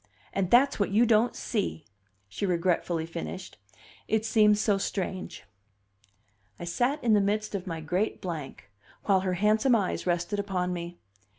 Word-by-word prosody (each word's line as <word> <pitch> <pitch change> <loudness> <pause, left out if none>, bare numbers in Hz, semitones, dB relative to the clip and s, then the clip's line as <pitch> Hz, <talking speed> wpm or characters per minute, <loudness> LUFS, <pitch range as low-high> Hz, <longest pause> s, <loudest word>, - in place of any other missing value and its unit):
And 190 -2 0
that's 255 +4 +4
what 200 - +1
you 215 +4 +4
don't 230 +1 +3
see," 200 -8 -3 0.4
she 100 - -7
regretfully 170 -2 0
finished. 170 - -7 0.5
"It 220 0 0
seems 210 -2 +4
so 205 -2 +2
strange." 190 -1 -4 1.2
I - - -6
sat 245 - -1
in 230 -2 +3
the 205 - +5
midst 210 +2 -1
of 195 -1 -4
my 165 -2 -4
great 180 +7 -1
blank, 150 - -7 0.3
while 195 -2 +3
her 185 -1 -1
handsome 215 +6 +3
eyes 195 -3 -1
rested 175 +4 0
upon 185 -3 -1
me. 175 0 -6
195 Hz, 155 wpm, -28 LUFS, 175-215 Hz, 1.2 s, the